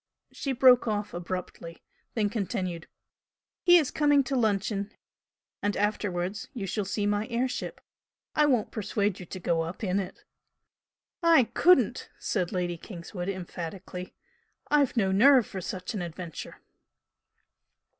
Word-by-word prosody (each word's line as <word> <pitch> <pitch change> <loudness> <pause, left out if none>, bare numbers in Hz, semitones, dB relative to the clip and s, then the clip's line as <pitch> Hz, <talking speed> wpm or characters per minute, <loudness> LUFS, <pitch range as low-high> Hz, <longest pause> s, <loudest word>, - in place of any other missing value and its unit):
She 275 - -3
broke 250 -1 +6
off 210 -1 -2
abruptly 175 -1 -6 0.3
then 215 -3 +2
continued 190 -6 -3 0.7
"He 350 0 +7
is 305 -6 +1
coming 290 -2 +4
to 270 +1 -2
luncheon, 205 -3 0 0.7
and 205 0 0
afterwards 200 -2 -1
you 210 -5 -3
shall 205 +1 -2
see 205 +2 -1
my 205 +1 0
air 240 +2 0
ship. 255 - -5 0.5
I 300 -1 +4
won't 245 -7 +1
persuade 205 -2 -1
you 180 - -9
to 185 - -7
go 170 -1 +1
up 165 +6 -5
in 190 0 +1
it!" 190 - -6 1.0
"I 335 -5 +6
COULDN'T!" 360 +1 +4
said 180 -5 -1
Lady 175 -3 -1
Kingswood, 175 0 -6
emphatically 180 0 -6 0.6
"I've 285 -4 +3
no 195 -4 +3
nerve 250 +4 +6
for 190 - -6
such 185 +3 -5
an 205 - -3
adventure." 170 -1 -7
205 Hz, 135 wpm, -28 LUFS, 180-240 Hz, 1.0 s, He